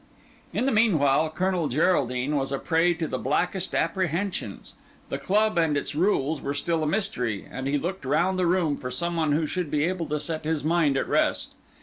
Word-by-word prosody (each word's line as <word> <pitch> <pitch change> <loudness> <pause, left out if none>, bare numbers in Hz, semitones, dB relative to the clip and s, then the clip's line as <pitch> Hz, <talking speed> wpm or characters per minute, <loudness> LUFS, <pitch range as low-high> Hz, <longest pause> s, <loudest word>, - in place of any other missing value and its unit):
In - - -1
the 275 - +2
meanwhile 160 -9 +3
Colonel 180 0 0
Geraldine 140 -2 +1
was 135 -1 -1
a 140 - 0
prey 170 +4 +2
to 160 -1 -3
the 130 - -3
blackest 180 +7 -1
apprehensions; 175 - -2 0.4
the 135 - -3
club 205 +5 +2
and 160 -3 +2
its 145 - -3
rules 155 -3 +1
were 140 +1 -3
still 165 +3 -1
a 155 - 0
mystery, 150 - -1
and 130 +1 -4
he 145 +1 +1
looked 175 +4 -4
round 175 +8 +1
the 180 - +2
room 170 -5 +1
for 125 - -5
some 170 +7 -2
one 155 -3 +1
who 155 +2 +1
should 175 +1 -3
be 150 0 +1
able 175 -1 -1
to 150 0 -1
set 155 +1 -4
his 155 -1 -1
mind 155 -3 +2
at - - -1
rest. - - +1
160 Hz, 205 wpm, -26 LUFS, 140-180 Hz, 0.4 s, meanwhile